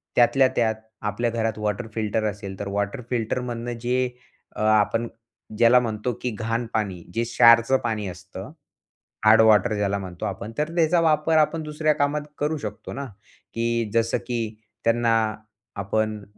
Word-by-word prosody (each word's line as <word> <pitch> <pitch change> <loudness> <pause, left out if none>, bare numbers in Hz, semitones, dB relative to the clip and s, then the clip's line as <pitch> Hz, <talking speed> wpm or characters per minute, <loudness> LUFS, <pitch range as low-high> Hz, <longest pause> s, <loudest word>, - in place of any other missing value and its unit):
त्यातल्या 130 +2 +5
त्यात 110 -2 +2 0.3
आपल्या 120 +4 -1
घरात 115 -2 -1
वॉटर 105 +2 -2
फिल्टर 110 0 -1
असेल, 100 -1 -9
तर 100 - -4
वॉटर 100 +5 -2
फिल्टरमधनं 120 0 -2
जे 125 +1 0 0.5
अ, - - -5
आपण 110 +2 +2 0.5
ज्याला 120 +2 +6
म्हणतो, 115 0 -2
की 125 - -1
घाण 115 +1 -1
पाणी 95 -5 -2
जे 115 - +1
क्षारचं 115 +2 +5
पाणी 110 -4 -2
असतं, 90 0 -9 0.7
हार्ड 110 +1 +7
वॉटर 110 -1 +5
ज्याला 100 -1 0
म्हणतो 90 -2 -6
आपण, 100 +2 -5
तर 150 +1 0
त्याचा 170 0 +3
वापर 160 0 +3
आपण 155 +1 +2
दुसऱ्या 150 0 0
कामात 145 +1 0 0.2
करू 150 +2 0
शकतो 145 - -7
ना, 140 0 -5 0.5
की 115 -1 -1
जसं 115 0 +2
की 115 -3 -3 0.3
त्यांना 115 0 +3 0.6
आपण 105 +1 -1
115 Hz, 150 wpm, -24 LUFS, 105-125 Hz, 0.7 s, हार्ड